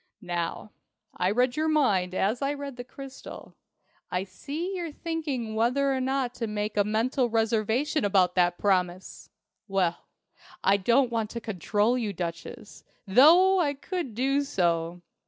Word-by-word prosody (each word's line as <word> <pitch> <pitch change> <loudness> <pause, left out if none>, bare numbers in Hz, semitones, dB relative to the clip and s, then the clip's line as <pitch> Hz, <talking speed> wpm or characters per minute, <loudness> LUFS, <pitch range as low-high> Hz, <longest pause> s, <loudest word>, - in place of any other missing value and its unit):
Now, 175 +4 -4 0.4
I 180 - +1
read 245 +4 +1
your 310 +1 0
mind 200 -13 +2
as 215 +8 0
I 280 +1 0
read 280 -2 -7
the 245 - -7
crystal. 270 +2 -10 0.6
I 180 +1 -1
see 295 - -5
you're 340 -3 -4
thinking 295 -8 -4
whether 250 +5 +1
or 260 - -1
not 260 -1 -1
to 230 - -2
make 210 0 -3
a 205 - +3
mental 235 +4 0
reservation 225 +6 +1
about 190 -3 +3
that 175 -1 +2
promise! 185 -2 -1 0.4
Well, 185 -4 -1 0.6
I 195 +1 +4
don't 240 +6 +2
want 225 -2 -1
to 235 - -5
control 215 +3 0
you, 215 -4 -2
Duchess, 170 -2 -7 0.2
though 335 - +6
I 290 -5 +1
could 305 - -5
do 270 +4 +1
so. 170 -8 -1
230 Hz, 150 wpm, -27 LUFS, 195-275 Hz, 0.6 s, though